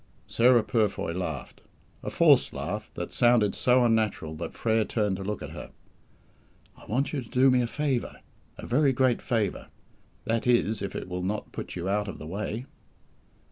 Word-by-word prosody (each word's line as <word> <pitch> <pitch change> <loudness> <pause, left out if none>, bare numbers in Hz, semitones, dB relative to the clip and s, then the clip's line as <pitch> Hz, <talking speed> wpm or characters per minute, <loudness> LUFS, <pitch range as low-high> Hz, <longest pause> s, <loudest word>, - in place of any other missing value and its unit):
Sarah 120 -1 +4
Purfoy 105 -6 0
laughed; 80 -6 -5 0.4
a - - -4
forced - - +4
laugh, - - -4
that - - -5
sounded 120 -4 +4
so 125 0 +3
unnatural, 110 -9 0
that 85 +1 -6
Frere 110 -1 +1
turned 105 -3 -1
to 95 - -6
look 105 +1 -4
at - - -7
her. - - -8 1.1
"I - - -17
want 135 +8 -1
you 140 - -1
to 120 - -12
do 130 +1 +4
me 125 -1 +3
a 120 - 0
favour 135 -1 -2 0.4
a - - -8
very 135 +2 +3
great 130 -1 +2
favour; 110 -5 -1 0.6
that 115 +1 -1
is 110 -4 +2
if 100 - -4
it - - -5
will 90 0 -4
not 100 +3 -3
put - - -6
you 90 0 -4
out 105 +1 0
of 100 - -6
the 75 - -9
way." 105 +7 -4
110 Hz, 180 wpm, -27 LUFS, 100-125 Hz, 1.1 s, Sarah